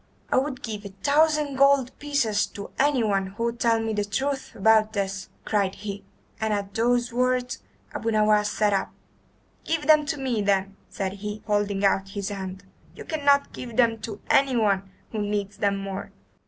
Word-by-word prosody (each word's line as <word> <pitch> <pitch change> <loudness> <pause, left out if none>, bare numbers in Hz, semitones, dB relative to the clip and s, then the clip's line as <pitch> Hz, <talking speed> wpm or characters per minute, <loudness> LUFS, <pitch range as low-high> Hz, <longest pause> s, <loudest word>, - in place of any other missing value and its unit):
"I - - +3
would 260 -1 -1
give 210 -3 -5
a 200 - -7
thousand 300 -1 +3
gold 275 -2 +4
pieces 240 -8 +1
to 200 - -9
anyone 225 -9 +2
who 200 +4 -5
would 235 0 -2
tell 230 -1 +3
me 225 0 -2
the 210 -1 0
truth 265 +7 -2
about 220 +1 +4
this," 195 -2 -3 0.2
cried 200 -3 +1
he, 200 0 -6 0.4
and 220 0 0
at 200 -1 -2
the 240 +2 +1
words 250 0 0 0.3
Abu 225 - -2
Nowas 210 -1 +3
sat 210 -1 +1
up. 195 - 0 0.7
"Give 320 -2 -1
them 305 -1 +5
to 300 - -1
me, 255 -5 -1
then," 195 -1 +1
said 195 -2 -3
he, 210 +1 -5
holding 205 -1 0
out 195 0 +2
his 200 0 -2
hand. 190 -1 -6 0.3
"You - - -9
cannot 285 -3 +2
give 235 -3 -7
them 230 -2 +3
to 215 -2 -6
anyone 215 -8 +2 0.2
who 220 - -3
needs 205 -1 -2
them 200 -1 +1
more." 195 0 -5
215 Hz, 175 wpm, -25 LUFS, 200-255 Hz, 0.7 s, them